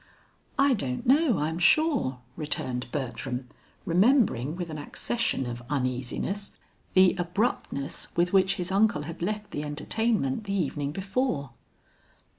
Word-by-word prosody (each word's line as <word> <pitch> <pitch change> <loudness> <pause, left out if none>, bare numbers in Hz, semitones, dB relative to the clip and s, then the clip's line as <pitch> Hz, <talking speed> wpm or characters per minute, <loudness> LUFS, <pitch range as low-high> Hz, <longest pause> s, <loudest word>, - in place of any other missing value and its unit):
"I 275 -1 +5
don't 130 - -2
know, 275 - +4
I 150 0 0
am 160 +1 -4
sure," 245 - +3
returned 130 -5 -2
Bertram, 125 -1 -3 0.4
remembering 180 - +3
with 175 -2 -5
an 155 - -5
accession 230 - -1
of 120 0 -5
uneasiness, 135 +9 -2 0.4
the 185 -1 +7
abruptness 175 - -1
with 175 +2 +2
which 190 -1 +4
his 180 +1 -3
uncle 200 -6 +3
had 165 +3 -8
left 210 +3 -3
the 145 - -3
entertainment 155 - -1
the 200 - -2
evening 145 -6 -1
before. 190 - -1
170 Hz, 130 wpm, -27 LUFS, 140-210 Hz, 0.4 s, the